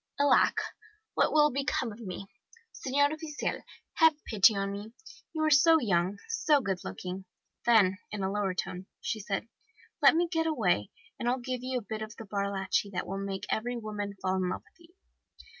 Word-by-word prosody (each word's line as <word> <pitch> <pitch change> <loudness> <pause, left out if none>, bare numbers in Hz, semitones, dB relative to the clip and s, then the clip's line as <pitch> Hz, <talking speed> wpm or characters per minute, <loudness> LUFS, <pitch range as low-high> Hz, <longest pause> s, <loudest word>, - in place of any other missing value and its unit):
"'Alack! 285 0 +4 0.5
What - - +3
will 300 -1 +5
become 260 -3 -1
of 210 - -11
me! 195 -3 -6 0.5
Senor 285 +3 +1
Oficial, 315 -1 -3 0.4
have 320 -2 +6
pity 215 0 +5
on 195 0 -1
me! 205 +3 -7 0.4
You 315 -1 -2
are 310 - +3
so 320 +3 +7
young, 190 - +1
so 445 -10 +3
good 195 -7 -2
looking.' 180 - -6 0.4
Then, 200 -5 +5
in 210 -2 -3
a 190 - 0
lower 200 -2 -1
tone, 185 +1 -4
she 220 - -3
said, 200 +1 -3 0.5
'Let - - +7
me 345 +1 +2
get 325 -1 0
away, 190 - +1 0.3
and 240 - 0
I'll 250 - +1
give 255 0 -4
you 255 0 -2
a - - -2
bit 215 +1 -5
of 215 0 -6
the 225 - -9
bar 200 0 -1
lachi, 195 +1 0
that 180 - -2
will 195 +1 -4
make 195 +1 -4
every 245 +2 -1
woman 210 -2 -4
fall 185 0 0
in 185 -1 0
love - - -4
with - - -28
you! 350 - -29
215 Hz, 190 wpm, -30 LUFS, 195-280 Hz, 0.5 s, so